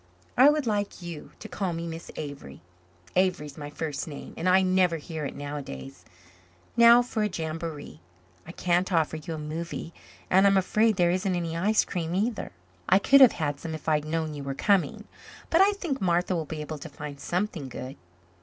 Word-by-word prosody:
"I 260 +4 +8
would 300 -2 +1
like 205 -4 -2
you 170 -3 -8
to 220 - -9
call 185 -2 -3
me 165 +1 -4
Miss 165 0 -7
Avery. 140 - -7 0.6
Avery 185 -4 +2
is 145 -1 -10
my 145 -1 -7
first 150 0 -4
name 145 -3 -8
and 175 +3 0
I 190 +1 +5
never 185 -2 +3
hear 155 0 -6
it - - -5
nowadays. 140 - -7 0.7
Now 235 +1 +8
for 235 -3 -3
a 210 - +2
jamboree! 160 - -5 0.5
I - - -7
can't 180 +2 0
offer 160 -2 +1
you 160 +1 -6
a - - -6
movie 165 +2 -5 0.3
and 190 +2 +5
I'm 195 0 +4
afraid 215 +3 +3
there 175 -2 +3
isn't 185 +1 0
any 165 -2 -2
ice 210 +6 +2
cream 170 -1 -3
either. 215 +3 -1 0.4
I 190 - +7
could 275 +7 +6
have 260 - +9
had 145 -3 -2
some 160 -1 -5
if 155 - -10
I'd 150 -1 +2
known 160 0 -2
you 145 -1 -6
were 135 0 -4
coming. 195 +5 +1 0.5
But 335 - +5
I 400 +1 +5
think 335 -10 -4
Martha 180 0 +1
will 165 -2 -2
be 155 +1 -5
able 150 0 -6
to - - -8
find 145 -2 -8
something 175 -6 -2
good." 130 +2 -7
170 Hz, 200 wpm, -27 LUFS, 150-195 Hz, 0.7 s, have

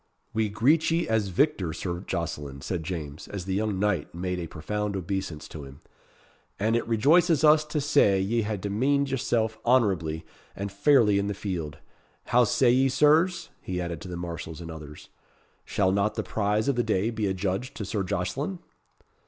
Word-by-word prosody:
"We 110 -1 +1
greet 140 +10 +3
ye 165 +1 +1
as 110 -2 +1
victor, 95 - +1
Sir 85 0 -4
Jocelyn," 75 -7 -4
said 90 +2 -3
James, 80 -4 -6
as 95 -3 -6
the 95 - -2
young 105 0 0
knight 95 -6 -1
made 90 +1 -2
a 85 - -4
profound 105 +6 -3
obeisance 95 -4 -4
to 75 - -8
him; 70 0 -12 0.8
"and 110 +3 +1
it 115 - -1
rejoices 155 - +4
us 155 0 +6
to 150 0 -2
say 135 -9 +3
ye 110 +5 +1
hae 105 -1 -2
demeaned 135 +9 0
yourself 110 -4 0
honourably 95 -10 +2 0.3
and 100 0 -4
fairly 105 -1 +4
in 100 - -1
the 105 - -2
field. 85 -6 -4 0.5
How 125 0 +4
say 120 +2 +3
ye, 130 +2 +3
Sirs?" 160 +6 +3
he 90 -1 -4
added 85 -3 -4
to - - -8
the 90 -1 -5
marshals 85 -2 -6
and 85 -1 -7
others. 75 -2 -10 0.6
"Shall 95 -2 +1
not 100 +2 +1
the - - -2
prize 105 0 0
of 140 - +2
the 120 - +2
day 110 0 0
be 110 -3 -1
adjudged 95 +5 -2
to 105 - -4
Sir 100 +2 -2
Jocelyn?" 100 - -2
100 Hz, 180 wpm, -27 LUFS, 90-120 Hz, 0.8 s, us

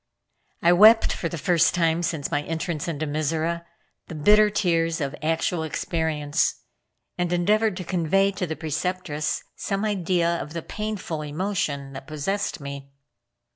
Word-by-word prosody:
I 170 +1 +6
wept 220 +5 +7
for 170 - -3
the 170 - -5
first 170 +2 +3
time 165 -1 +2
since 160 -4 -2
my 145 - +1
entrance 160 0 -3
into 155 -2 -2
Mizora, 160 +3 -1 0.4
the 160 - -7
bitter 210 +8 +5
tears 165 -5 +1
of 140 -1 -2
actual 160 +2 0
experience, 160 -1 -1 0.6
and 175 -1 0
endeavored 205 +3 +2
to 185 - -4
convey 185 +3 +2
to 190 -2 -3
the 160 - -3
Preceptress 155 -1 -2
some 200 +1 -2
idea 175 -4 +1
of 150 - -8
the 165 -1 -4
painful 210 -7 -4
emotion 150 -3 -2
that 135 0 -9
possessed 175 +7 -2
me. 140 -1 -7
165 Hz, 145 wpm, -24 LUFS, 155-185 Hz, 0.6 s, wept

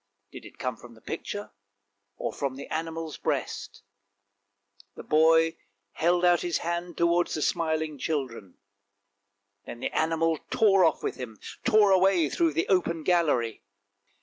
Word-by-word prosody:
Did - - -10
it - - -14
come 125 -4 -3
from 120 0 -14
the - - -17
picture, 205 0 -6 0.7
or - - -3
from 135 -2 -3
the 140 - -8
animal's 165 0 -4
breast? - - -3 1.1
The - - -9
boy 160 +1 +4 0.3
held 175 - +2
out 175 -1 +4
his 175 -1 0
hand 170 0 -4
towards 170 +1 +2
the 155 - -3
smiling 160 -3 -1
children; 125 - -4 1.1
then 120 - -7
the - - -4
animal 160 0 +1
tore 195 -4 +4
off 160 - +1
with - - -3
him, 115 -5 -8 0.2
tore 215 -4 +5
away 185 -5 +4
through 165 -2 +1
the 165 +3 0
open 170 -4 +1
gallery. 150 -11 +1
165 Hz, 145 wpm, -27 LUFS, 145-175 Hz, 1.1 s, tore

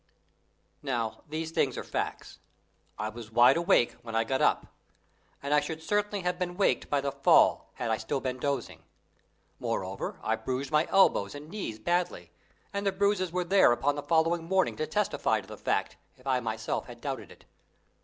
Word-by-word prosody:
Now 120 -6 -2
these 160 +1 -3
things - - 0
are - - -3
facts. - - -4 0.6
I 105 - -2
was 110 0 -9
wide 120 +2 +6
awake 170 -7 +3
when 115 -1 -7
I 115 - +3
got 130 +4 -1
up, - - +3 0.8
and 140 +1 0
I 150 - +6
should 160 +1 -5
certainly 205 +1 0
have 180 0 -2
been 175 -1 -3
waked 200 - +1
by 145 -1 +1
the 140 0 -1
fall 140 0 +4
had 115 - -2
I 110 - +2
still 125 +6 -2
been 130 -1 -3
dozing. 140 -2 -2 0.8
Moreover, - - -3
I 110 - 0
bruised 130 +4 -3
my 150 +1 +3
elbows 145 - +3
and 145 +2 -9
knees 190 - -5
badly, 175 - -1 0.4
and 200 0 -2
the 200 - +2
bruises 195 -2 +1
were 180 +1 0
there 175 -9 +4
on 145 - +4
the 145 - -3
following 165 +1 +1
morning 190 +2 +1
to 155 - -2
testify 210 -1 +1
to - - -12
the - - -8
fact, - - -1 0.2
if 130 - -21
I 130 -2 +2
myself 110 -2 -3
had - - -11
doubted - - -5
it. - - -17
145 Hz, 185 wpm, -29 LUFS, 120-180 Hz, 0.8 s, wide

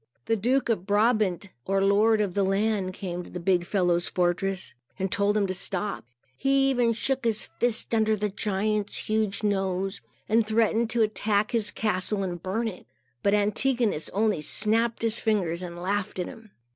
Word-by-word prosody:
The 225 - +1
Duke 250 +5 +1
of 200 -5 -1
Brabant, 205 -3 +1 0.2
or 195 0 +1
Lord 210 +2 +4
of 200 -4 -1
the 200 - +1
land, 195 0 0
came 180 -2 -5
to - - -11
the 180 - -6
big 180 0 +2
fellow's 175 -3 +1
fortress 185 +2 -1 0.2
and 190 -1 -2
told 205 -1 +2
him 205 - +2
to 185 - -2
stop. 190 - -3 0.3
He 270 - +2
even 245 -3 +2
shook 265 +3 -2
his 225 -2 0
fist 240 -1 0
under 220 -1 +3
the 210 0 -2
giant's 205 +1 -1
huge 215 -1 -1
nose, 195 -1 -1 0.3
and 225 +1 +3
threatened 225 +1 +1
to 235 -1 +2
attack 210 0 0
his 225 -4 +3
castle 205 -1 0
and 175 -3 -4
burn 220 +6 -2
it. 185 -5 -8 0.3
But 200 +1 +3
Antigonus 210 - +1
only 210 -4 0
snapped 225 +8 +1
his 230 0 +1
fingers, 185 -6 0
and 175 -1 -7
laughed 195 +2 -2
at 180 - -1
him. 225 +3 -11
205 Hz, 175 wpm, -26 LUFS, 190-225 Hz, 0.3 s, Lord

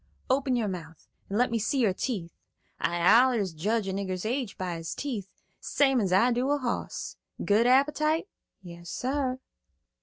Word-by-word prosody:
"Open 265 -1 +2
your 230 -3 0
mouth, 165 -4 -7 0.2
and 200 - -1
let 245 0 +2
me 230 - +1
see 220 +6 0
your 220 -7 +3
teeth. 185 -5 -3 0.5
I 175 - 0
allers 230 -6 +5
judge 205 +6 -1
a 190 - -2
nigger's 190 -1 -3
age 245 -1 -2
by 180 -2 -3
his 165 0 -5
teeth, 235 -9 -4 0.3
same 270 -4 +2
as 190 -3 -1
I 230 +7 +4
do 245 +3 0
a 290 - +3
hoss. 250 -4 -4 0.3
Good 215 +4 +4
appetite?" 300 +6 +3 0.4
"Yas, 170 -1 -10
sar." 260 0 -1
230 Hz, 170 wpm, -28 LUFS, 190-260 Hz, 0.5 s, allers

